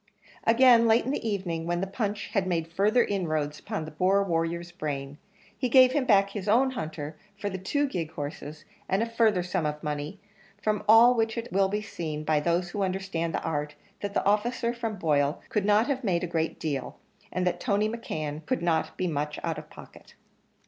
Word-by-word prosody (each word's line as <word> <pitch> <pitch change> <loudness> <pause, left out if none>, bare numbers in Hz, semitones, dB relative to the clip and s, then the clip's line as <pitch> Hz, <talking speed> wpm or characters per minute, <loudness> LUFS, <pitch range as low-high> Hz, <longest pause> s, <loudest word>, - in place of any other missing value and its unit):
Again, 235 0 +6
late 225 +1 +4
in 260 - -1
the 230 -5 -2
evening 170 -5 -3
when 175 0 0
the 190 - -1
punch 205 +1 -3
had 195 -3 0
made 165 -3 -1
further 210 +6 +3
inroads 155 -7 -2
upon 155 - -4
the 155 - -8
poor 190 +5 +2
warrior's 170 -1 -2
brain 145 -4 -5 0.4
he 255 - -1
gave 255 0 +7
him 275 -1 +1
back 200 -4 +4
his 200 -1 -5
own 260 +5 +4
hunter 155 - -6 0.2
for 205 0 -3
the 190 - -4
two 285 +10 0
gig 175 - -3
horses 145 +1 -7 0.2
and 195 +4 +2
a - - +1
further 225 -5 +2
sum 180 -1 -1
of 150 +1 -5
money: 150 +5 -4 0.4
from 210 -1 -1
all 230 +3 +8
which 225 -1 0
it 230 +1 -5
will 195 0 +4
be 210 +2 -2
seen 155 -7 -5
by 155 0 +2
those 170 +3 0
who 205 - -3
understand 185 -3 -2
the - - -3
art, 150 -1 -2 0.2
that 200 -1 -5
the - - +1
officer 235 +3 +1
from 230 -2 -3
Boyle 150 -3 +1
could 210 -2 0
not 210 +2 +4
have 270 -1 -2
made 180 -5 +1
a 175 - -5
great 160 0 -1
deal, 145 -4 -3 0.3
and 180 0 -1
that 175 -1 0
Tony 205 +3 +1
McKeon 155 -9 -4
could 255 -8 -1
not 165 -2 0
be 185 - -1
much 150 -3 -2
out - - -2
of - - -13
pocket. - - -14
190 Hz, 205 wpm, -27 LUFS, 160-220 Hz, 0.4 s, all